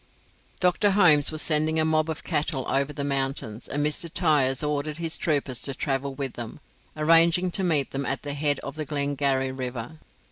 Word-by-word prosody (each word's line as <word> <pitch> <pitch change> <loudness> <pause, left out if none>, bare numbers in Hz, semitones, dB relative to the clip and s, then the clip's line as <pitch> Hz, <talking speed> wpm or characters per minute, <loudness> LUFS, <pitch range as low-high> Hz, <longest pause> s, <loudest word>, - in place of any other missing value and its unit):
Dr. 180 +3 +2
Holmes 160 -8 +6
was 155 0 +3
sending 155 0 +1
a 155 - +3
mob 155 0 +1
of 160 - -5
cattle 135 -3 -2
over 140 +2 0
the 145 -1 -4
mountains, 135 -5 -2
and 145 +1 -1
Mr. 150 +3 -1
Tyers 145 -6 +2
ordered 150 0 -2
his 165 -1 -2
troopers 140 -5 -1
to 135 - -3
travel 135 0 -2
with 135 -2 -4
them, 120 +3 -7 0.4
arranging 165 +3 +4
to 190 - -1
meet 155 -6 +1
them 140 -1 -3
at 135 - -3
the 145 -1 -4
head 145 -1 0
of 140 - -6
the 155 - -3
Glengarry 140 -2 -1
river. 130 +2 -6
145 Hz, 185 wpm, -25 LUFS, 135-155 Hz, 0.4 s, Holmes